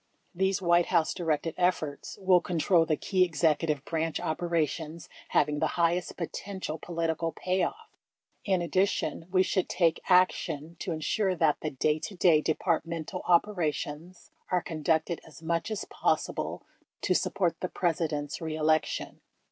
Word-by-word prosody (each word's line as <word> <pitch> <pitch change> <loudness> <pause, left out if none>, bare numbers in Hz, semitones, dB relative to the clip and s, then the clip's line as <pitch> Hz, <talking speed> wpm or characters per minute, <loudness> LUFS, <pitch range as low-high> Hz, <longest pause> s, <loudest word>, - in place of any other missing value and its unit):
These 190 +1 0
White 175 0 +4
House 170 -3 +2
directed 165 -2 -1
efforts 175 -5 -1
will 185 -2 +4
control 170 -1 +2
the 155 - +1
key 185 -2 +2
Executive 155 -3 +1
Branch 165 -1 -1
operations 165 -1 -2 0.2
havmg 150 0 +2
the - - +2
highest 175 +1 +1
potential 180 -2 -5
political 165 -1 -2
payoff. 185 - -1 0.6
In 190 -4 +1
addition, 185 -2 0
we 185 0 +4
should 185 -1 0
take 170 -3 +2
action 170 -3 +2
to 190 - -3
ensure 185 +5 0
that 160 -3 +2
the 155 - -1
day 150 +2 0
to 195 - -6
day 170 -4 +5
Departmental 165 +2 -1
operations 170 -2 0 0.2
are 180 -1 +1
conducted 160 +1 0
as 160 0 -15
much 165 +4 -1
as 215 -2 -3
possible - - -1 0.4
to - - +2
support 175 -3 0
the 180 - -3
Presi 165 -2 0
dent's 145 0 -4
re 160 -1 -3
election. 155 0 0
170 Hz, 140 wpm, -29 LUFS, 155-180 Hz, 0.6 s, day